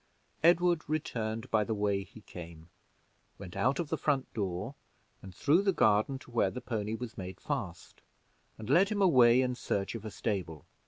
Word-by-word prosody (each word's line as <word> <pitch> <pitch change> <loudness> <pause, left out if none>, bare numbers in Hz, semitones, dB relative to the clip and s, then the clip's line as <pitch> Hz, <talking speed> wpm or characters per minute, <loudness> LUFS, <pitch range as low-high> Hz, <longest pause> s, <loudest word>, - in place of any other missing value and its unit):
Edward 175 0 +4
returned 115 -6 -3
by 110 -1 +3
the 110 +1 -2
way 100 -1 0
he 110 +2 -15
came, 85 -3 -11 0.7
went 95 -3 -10
out 130 +3 +1
of 170 -4 -3
the 160 - -2
front 140 -3 0
door 100 +3 -3 0.5
and 95 -2 -11
through 150 - +3
the 200 -1 +2
garden 110 - +2
to 125 - -15
where 120 - +2
the 125 - -6
pony 110 -3 -3
was 115 -2 -7
made 95 0 -7
fast, 85 -3 -5 0.6
and 110 - -8
led 175 +9 +4
him 210 -2 -1
away 130 -7 +6
in 125 0 -1
search 100 -5 -2
of 115 -3 -6
a 110 - -5
stable. 90 - -4
115 Hz, 180 wpm, -31 LUFS, 100-140 Hz, 0.7 s, away